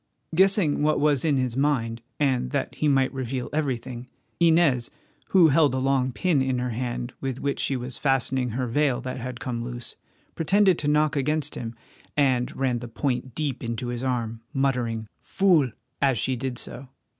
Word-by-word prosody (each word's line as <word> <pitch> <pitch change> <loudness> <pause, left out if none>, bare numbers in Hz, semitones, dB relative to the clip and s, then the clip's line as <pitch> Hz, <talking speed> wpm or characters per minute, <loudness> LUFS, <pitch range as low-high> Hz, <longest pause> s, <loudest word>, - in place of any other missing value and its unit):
Guessing 190 -4 +3
what 155 0 +2
was 145 -2 +2
in 150 -4 +2
his 130 -2 -1
mind, 125 -5 0 0.2
and 130 - +1
that - - -2
he 155 - 0
might 135 -2 +3
reveal 130 -1 -3
everything, 130 -4 -2 0.3
Inez, 160 -8 +4 0.4
who 175 -4 +6
held 145 -2 +4
a - - 0
long 130 -1 +1
pin 165 0 +1
in 130 -1 0
her 125 0 -2
hand 120 +1 -3
with 135 -1 -3
which 140 -1 -2
she 135 - 0
was 125 0 -5
fastening 130 -2 +1
her 125 +3 -2
veil 130 +1 +1
that 130 0 -5
had 125 0 -6
come 120 -2 -3
loose, 120 0 -7 0.4
pretended 190 +2 +3
to 145 - -2
knock 150 0 +3
against 150 +1 0
him, 115 -1 -5 0.4
and 130 -1 +2
ran 130 -3 0
the 120 - -7
point 125 0 -2
deep 145 -5 -2
into 115 +1 -3
his 120 +1 -4
arm, 115 -3 -2
muttering, 125 -5 0
"Fool!" 175 -9 +3 0.3
as 135 -3 +3
she 130 +4 0
did 125 0 -4
so. 130 +2 -5
130 Hz, 180 wpm, -25 LUFS, 125-145 Hz, 0.4 s, who